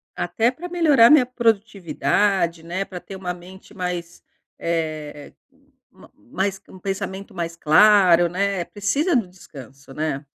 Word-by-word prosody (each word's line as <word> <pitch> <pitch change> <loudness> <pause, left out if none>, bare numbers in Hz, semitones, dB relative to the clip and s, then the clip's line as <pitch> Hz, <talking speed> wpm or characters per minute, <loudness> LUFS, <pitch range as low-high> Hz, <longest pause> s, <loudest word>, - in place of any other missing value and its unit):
Até 230 +1 0
pra 330 +8 -8
melhorar 300 -9 +5
minha 295 -4 +6
produtividade, 200 -6 0
né. 180 +4 -3
Pra 180 -2 -8
ter 195 - -11
uma 185 -2 -4
mente 185 +3 -14
mais, 180 -2 -5 0.3
eh, 155 -3 -4 0.6
ma - - -18
mais 195 0 -4
um 185 - -13
pensamento 195 +1 -5
mais 170 -2 -4
claro, 175 +1 +5
né. 195 0 -1
Precisa 240 - -1
do 230 -7 +1
descanso, 135 -6 -14
né? 150 -2 -3
190 Hz, 135 wpm, -22 LUFS, 170-210 Hz, 0.6 s, minha